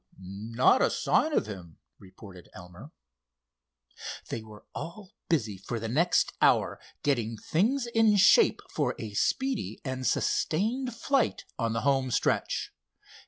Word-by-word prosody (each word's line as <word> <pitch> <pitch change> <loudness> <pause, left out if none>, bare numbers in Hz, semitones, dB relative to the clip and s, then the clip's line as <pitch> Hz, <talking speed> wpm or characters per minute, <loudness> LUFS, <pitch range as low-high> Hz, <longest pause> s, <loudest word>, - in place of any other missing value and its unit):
"Not 110 - +1
a - - +4
sign 315 - +1
of - - +1
him," 90 -6 -9 0.2
reported 95 -1 -14
Elmer. 90 - -12 1.4
They 115 - -4
were 110 -1 -14
all 190 +3 -8 0.2
busy 110 - 0
for 115 +4 -4
the 115 - -4
next 165 +9 +2
hour, - - +3 0.2
getting 115 -6 0
things 235 - 0
in 225 -3 +3
shape 200 - +5
for - - -1
a - - -7
speedy 265 -4 -1
and 130 -1 -3
sustained 230 +9 0
flight 265 +2 0
on 115 -1 0
the 115 - -1
home 135 -2 +1
stretch. 120 - -1
130 Hz, 130 wpm, -28 LUFS, -, 1.4 s, shape